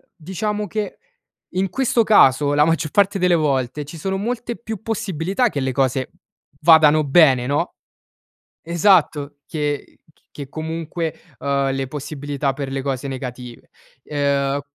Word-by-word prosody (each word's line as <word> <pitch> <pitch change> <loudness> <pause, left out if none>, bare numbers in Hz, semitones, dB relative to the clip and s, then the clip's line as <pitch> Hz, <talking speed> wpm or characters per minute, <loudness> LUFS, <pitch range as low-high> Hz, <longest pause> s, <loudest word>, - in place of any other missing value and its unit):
diciamo 205 +5 -3
che, 210 0 -4 0.6
in 190 +1 0
questo 250 -1 +1
caso 145 -9 +5
la 145 +1 +4
maggior 165 -1 0
parte 200 0 +2
delle 180 -1 +3
volte, 140 -3 0
ci 150 +4 -10
sono 190 +4 -2
molte 235 +3 -3
più 220 -3 -7
possibilità 200 - -1
che 145 - -3
le 130 -1 -1
cose 130 -1 0 0.5
vadano 155 -2 +6
bene, 135 -4 +5
no? 145 +2 -1 0.9
Esatto, 165 -5 +2
che 150 -2 -3 0.4
che 140 -2 -8
comunque, 160 +2 -4 0.3
uhm, 140 -1 0
le 135 -1 -3
possibilità 145 0 -3
per 135 0 -5
le 135 0 -3
cose 135 0 -3
negative. 125 -2 -7 0.4
Ehm 140 -1 0
150 Hz, 135 wpm, -21 LUFS, 140-185 Hz, 0.9 s, vadano